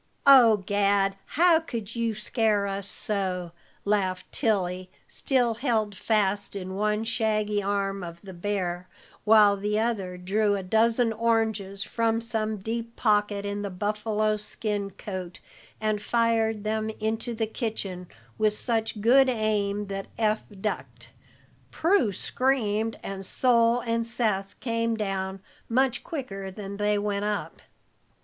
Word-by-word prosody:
"Oh, 250 -6 +8
Gad, 200 -1 +2
how 340 0 +4
could 230 -9 -6
you 230 -2 -1
scare 215 -1 +1
us 195 0 -3
so?" 185 -5 -2 0.3
laughed 190 -3 0
Tilly, 185 -6 0 0.2
still 250 -4 +1
held 220 -4 0
fast 205 -1 0
in 190 -1 -5
one 210 +2 0
shaggy 215 -3 0
arm 195 0 -1
of 170 0 -8
the 190 -1 -10
bear, 180 -1 -2 0.4
while 210 -2 +7
the 210 +1 -1
other 210 -5 -1
drew 205 +3 +1
a 195 - -3
dozen 225 +4 +2
oranges 220 -4 0
from 230 -1 0
some 220 -2 -2
deep 230 +3 -4
pocket 205 -2 +1
in 200 0 -3
the 200 - -3
buffalo 210 +2 0
skin 210 -1 -3
coat, 185 -2 -7 0.4
and 215 -1 0
fired 225 -2 +1
them 220 0 -1
into 225 +2 -2
the 225 0 0
kitchen 210 -5 -4 0.3
with 215 -1 +3
such 220 -1 -1
good 260 +4 +6
aim 210 -3 0
that 195 0 -5
Eph 215 -1 +1 0.2
ducked, 125 - -4 0.6
Prue 325 - +2
screamed, 225 -1 0
and 195 0 -5
Sol 235 +2 +3
and 230 -1 0
Seth 215 -4 -1
came 230 -1 0
down 195 -2 -3 0.3
much 255 +1 +1
quicker 195 -11 -5
than 200 +1 -7
they 210 0 +1
went 205 0 -1
up. 210 -1 -3
210 Hz, 135 wpm, -27 LUFS, 200-230 Hz, 0.6 s, Oh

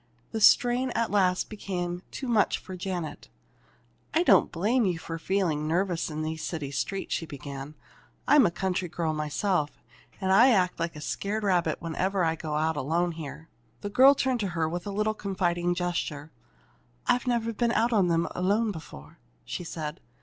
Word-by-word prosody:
The 220 - -3
strain 245 +4 +5
at 230 - 0
last 185 -3 +2
became 180 -4 -4
too 265 - -6
much 225 -4 +3
for 185 - -9
Janet. 180 -3 -5 0.9
"I 335 - +4
don't - - +5
blame 220 +9 +1
you 175 -2 0
for 165 0 -6
feeling 165 -5 0
nervous 175 +1 0
in 155 0 -4
these 160 0 -4
city 150 -5 -4
streets," 190 +7 -2
she 165 - -2
began. 140 0 -8 0.5
"I'm 285 -6 +6
a - - +1
country 185 +1 -2
girl 160 -1 -1
myself, 155 +1 -1 0.4
and 190 -2 0
I 235 +7 +7
act 185 -8 +2
like 170 -1 -2
a 150 - -8
scared 210 +7 -3
rabbit 180 -4 +1
whenever 185 +3 0
I 160 -1 +2
go 155 -2 -4
out 160 +1 0
alone 170 +5 0
here." 160 0 -8 0.3
The 205 - -4
girl 265 +5 +7
turned 260 -2 0
to 205 - -1
her 160 -1 +2
with 175 +3 -4
a - - -3
little 215 +2 0
confiding 175 -4 -1
gesture. 170 -4 -3 0.7
"I've 245 +1 +1
never 230 -2 0
been 235 +2 +1
out 235 +1 +2
in 200 -5 +4
them 170 0 +1
alone 205 +5 +1
before," 110 - -11 0.3
she - - -5
said. 155 -2 -5
180 Hz, 180 wpm, -27 LUFS, 160-210 Hz, 0.9 s, I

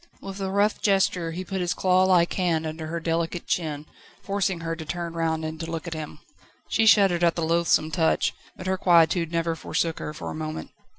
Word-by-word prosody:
With 195 0 -8
a 190 - -1
rough 205 +2 +1
gesture 190 -4 +2
he 180 +3 -5
put 190 0 -3
his 175 -1 -1
clawlike 185 -2 +3
hand 170 -4 0
under 155 0 -5
her 170 +1 -3
delicate 165 +1 -2
chin, 155 -3 -2 0.4
forcing 195 -3 -1
her 165 0 -3
to 165 - -7
turn 170 +1 -4
round 160 -1 -1
and 155 0 -5
to 165 0 -5
look 165 -1 -4
at 170 - -4
him. 155 -2 -6 0.5
She 225 0 +2
shuddered 195 -5 +5
at 170 -1 +3
the 165 - -1
loathsome 165 -1 +2
touch, 160 +1 +1 0.2
but 185 - -8
her 190 0 -1
quietude 170 -1 +4
never 165 -1 0
forsook 165 0 -2
her - - -4
for 150 - -6
a - - -5
moment. 155 0 -5
170 Hz, 210 wpm, -25 LUFS, 160-185 Hz, 0.5 s, shuddered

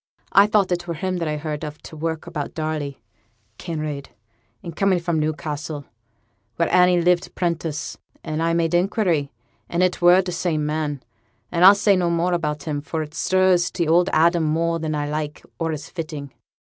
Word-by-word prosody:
I 200 +1 +6
thought 210 -3 +2
it 175 0 -1
were 170 - -3
him 185 +3 -2
when 165 -2 -2
I 150 0 -1
heerd 150 0 -4
of 150 0 -6
t' - - -10
work 160 0 -3
about 145 -2 -5
Darley; 155 -3 -3 0.6
Kinraid 155 -4 -4 0.6
and 170 -3 -7
coming 195 -2 +2
fra' 170 0 -2
Newcassel, 155 -1 -3 0.7
where 170 - 0
Annie 180 -1 +5
lived 175 +1 +1
'prentice 165 -3 -2 0.2
and 155 +1 -3
I 165 0 +1
made 165 0 +1
inquiry, 175 -5 +1 0.4
and 170 +1 +1
it 180 -1 0
were 175 +2 +6
t' 180 - -4
same 170 -3 -1
man. 150 -2 -2 0.5
But 170 - -1
I'll 190 +3 +9
say 200 0 +3
no 180 -2 +1
more 170 +1 +1
about 150 -4 -2
him, 145 -2 -3
for 160 +1 -3
it 150 0 -11
stirs 185 0 +2
t' 170 - -2
old 175 +3 +4
Adam 170 +1 +3
more 165 +2 0
nor 155 -2 -2
I 145 - -2
like, 150 0 -4 0.2
or 165 -1 -1
is 150 -2 -5
fitting.' 155 -5 -6
165 Hz, 185 wpm, -22 LUFS, 155-175 Hz, 0.7 s, I'll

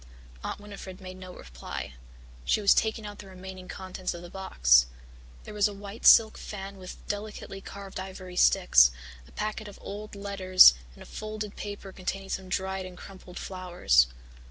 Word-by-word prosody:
Aunt - - -4
Winnifred 200 -2 -10
made 185 -1 -9
no 185 -1 -9
reply 65 - -8 0.5
she 60 - +2
was 200 -1 +6
taking 220 0 0
out 205 0 -8
the 205 - -10
remaining 185 0 -10
contents 185 -1 -5
of 170 - -9
the 175 - -10
box. 60 - +4 0.6
There - - -9
was 210 -1 +3
a 205 - -7
white 200 +2 -3
silk 220 -1 +7
fan 195 -1 -7
with 185 -1 -11
delicately 205 -1 -5
carved 195 -1 -8
ivory 185 -1 -8
sticks, - - +6 0.4
a - - -18
packet 215 0 -4
of 205 - -11
old 210 +1 -8
letters 195 - +7 0.2
and - - -12
a - - -14
folded 215 -1 -6
paper 205 -1 -7
containing 195 +1 -5
some 190 -1 -4
dried 190 0 -2
and 180 -1 -12
crumpled 190 -2 -11
flowers. 175 - +2
190 Hz, 170 wpm, -28 LUFS, 185-205 Hz, 0.6 s, silk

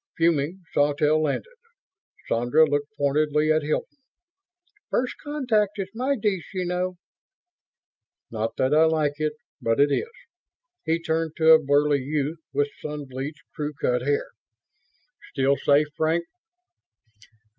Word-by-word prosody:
Fuming, 165 +2 +1
Sawtelle 150 +2 +2
landed. 150 -3 -1 0.8
Sandra 120 +7 +3
looked 145 0 0
pointedly 150 +2 +2
at 155 0 +3
Hilton. 155 - -3 0.9
"First 250 0 -1
contact 245 -9 0
is 195 -1 -3
my 260 +5 0
dish, 205 -7 -2
you 185 -1 -1
know." 180 +1 -2 1.4
"Not 110 0 -3
that 130 +2 +2
I 155 +1 +6
like 155 -2 0
it, 155 0 0 0.3
but 115 +3 +1
it 145 0 +4
is." 460 - 0 0.8
He 165 +1 +1
turned 160 -1 -2
to 160 0 +5
a 160 0 +8
burly 145 +1 +3
youth 150 +3 -2
with 145 0 0
sun 150 -1 -5
bleached, 135 +5 -6
crew 150 -1 -4
cut 125 0 +1
hair, 145 +3 -1 1.0
"Still 135 0 +2
safe, 145 +2 +3
Frank?" 160 +2 +1
155 Hz, 130 wpm, -25 LUFS, 145-170 Hz, 1.4 s, a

